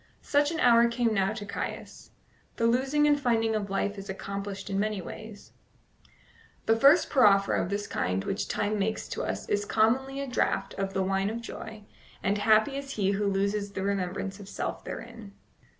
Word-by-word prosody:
Such 290 0 +2
an 325 0 -3
hour 235 -3 +6
came 235 -1 0
now 195 -1 +1
to 210 - -6
Caius. - - -6 0.5
The 230 - 0
losing 265 +5 +2
and 290 -1 +4
finding 225 -3 +2
of 210 -2 -2
life 200 +1 -1
is 195 - -9
accomplished 200 +1 -5
in 195 -1 -1
many 210 -1 -1
ways: 210 +3 -9 1.1
the 225 - +4
first 275 +8 +6
proffer 200 -7 +4
of 175 - 0
this 205 +1 -2
kind 90 +1 -1
which 195 - -2
Time 210 0 -1
makes 215 +2 -1
to - - -3
us - - -4
is 205 0 0
commonly 260 +6 +1
a 280 - -2
draught 245 -6 -1
of 195 0 -4
the 190 - +1
wine 195 +1 0
of 225 +2 -4
joy, 220 -2 -8 0.4
and 200 +1 +1
happy 220 +6 +3
is 275 0 -6
he 195 -2 +1
who 200 +1 0
loses 200 +1 -1
the 190 - -3
remembrance 195 0 -2
of 200 -1 -10
self - - -4
therein. 210 -3 -8
210 Hz, 185 wpm, -28 LUFS, 195-235 Hz, 1.1 s, hour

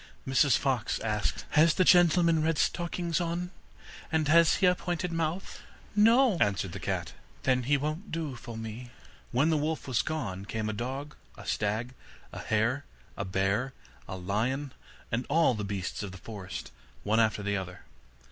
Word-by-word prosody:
Mrs 135 -1 +4
Fox 130 -6 0
asked: 105 -2 -1
'Has 155 +1 +5
the 185 - +4
gentleman 170 -2 +5
red 160 0 +1
stockings 170 -1 0
on, 175 +1 -2 0.6
and 160 -2 +1
has 170 +1 +6
he - - +2
a 180 - +6
pointed 175 0 -3
mouth?' 165 +2 -2 0.4
'No,' 225 -1 +5
answered 100 -2 +1
the 95 - -6
cat. 80 - -3 0.3
'Then 130 -1 +3
he 145 - +5
won't 155 +8 -4
do 155 -5 -3
for 120 -1 -8
me.' 115 +2 -7 0.4
When 140 +7 +3
the 155 - +3
wolf 155 +1 -2
was 120 -6 +2
gone, 105 -12 -4
came 110 0 -3
a - - -2
dog, 135 +6 -5 0.2
a - - -10
stag, 110 +4 -1 0.4
a - - -6
hare, 115 +6 0 0.3
a 100 - -3
bear, 100 +8 0 0.3
a 95 - -5
lion, 120 +10 -1 0.4
and 120 +3 -1
all 160 -2 +4
the 105 -2 -3
beasts 100 -2 -3
of 100 -2 -5
the 100 - -9
forest, 100 -2 -7 0.3
one 110 +2 +2
after 110 -2 +2
the 100 0 0
other. 90 -1 -6
130 Hz, 170 wpm, -29 LUFS, 105-165 Hz, 0.6 s, has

